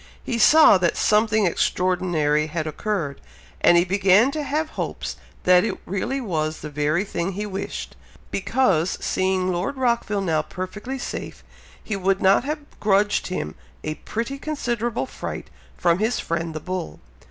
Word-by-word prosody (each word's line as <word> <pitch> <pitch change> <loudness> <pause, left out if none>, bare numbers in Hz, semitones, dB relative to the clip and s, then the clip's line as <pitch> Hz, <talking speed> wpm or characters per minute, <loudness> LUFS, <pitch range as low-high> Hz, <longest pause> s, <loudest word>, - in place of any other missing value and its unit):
He 235 - -2
saw 305 -6 +7
that 175 -2 +1
something 215 0 +3
extraordinary 175 -4 +1
had 155 0 -3
occurred, 155 -2 -3 0.4
and 175 - +7
he 170 - +4
began 195 +6 +4
to 305 - -3
have 305 +2 -1
hopes - - -4 0.3
that 180 0 +6
it - - -2
really 220 +9 -2
was 160 -9 -2
the 150 - -7
very 150 +5 +1
thing 190 -1 -3
he 205 +3 -3
wished; 195 -1 -5 0.4
because, 195 -6 +1
seeing 185 0 0
Lord 180 +10 -2
Rockville 235 -5 +1
now 160 -5 +1
perfectly 195 +10 -6
safe, 250 - -6 0.4
he 215 - -3
would 195 0 +1
not 195 +4 +4
have 300 +2 -1 0.2
grudged 205 0 +2
him 130 - -3 0.3
a 155 - -2
pretty 230 - -4
considerable 240 -7 -2
fright - - -7 0.3
from 170 0 +2
his 220 +3 +1
friend 165 -1 -3
the - - -2
bull. 185 +1 -5
190 Hz, 155 wpm, -23 LUFS, 170-225 Hz, 0.4 s, saw